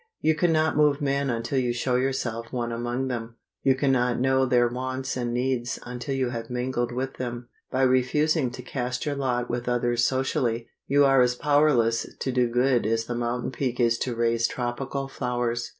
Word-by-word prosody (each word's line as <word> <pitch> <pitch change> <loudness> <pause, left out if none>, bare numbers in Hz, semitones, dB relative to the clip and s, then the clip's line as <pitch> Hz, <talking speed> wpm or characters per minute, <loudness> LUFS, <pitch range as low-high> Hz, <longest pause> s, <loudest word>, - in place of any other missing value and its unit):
You 160 - +3
can 165 +2 +2
not 160 0 +2
move 150 -1 +3
men 140 -1 0
until 120 +3 -1
you 125 -2 0
show 125 +1 0
yourself 125 -3 -1
one 120 -2 -2
among 120 +3 -2
them. 115 -2 -4 0.3
You 135 -1 +3
can 135 +1 +1
not 125 -2 +1
know 130 +1 +2
their 120 -1 +4
wants 130 +2 -3
and 120 -2 -2
needs 120 -1 -1
until 125 +2 -4
you 130 -2 0
have 115 -1 -5
mingled 125 -1 -1
with 130 +2 -4
them. 120 -1 -5 0.2
By 130 +1 +1
refusing 130 +3 +2
to 125 - -8
cast 125 +1 -3
your 145 - 0
lot 125 -3 -1
with 120 +1 -3
others 120 -1 +1
socially, 120 -3 0 0.2
you 140 +1 +4
are 135 -1 +5
as 125 0 +3
powerless 145 -5 +2
to 130 - -2
do 125 -1 +2
good 125 -1 +2
as 115 0 0
the 120 - -4
mountain 120 +1 -2
peak 130 -2 -2
is 115 -1 +3
to 125 -2 -2
raise 115 0 +2
tropical 135 +3 -3
flowers. 120 -3 -2
125 Hz, 195 wpm, -26 LUFS, 120-135 Hz, 0.3 s, are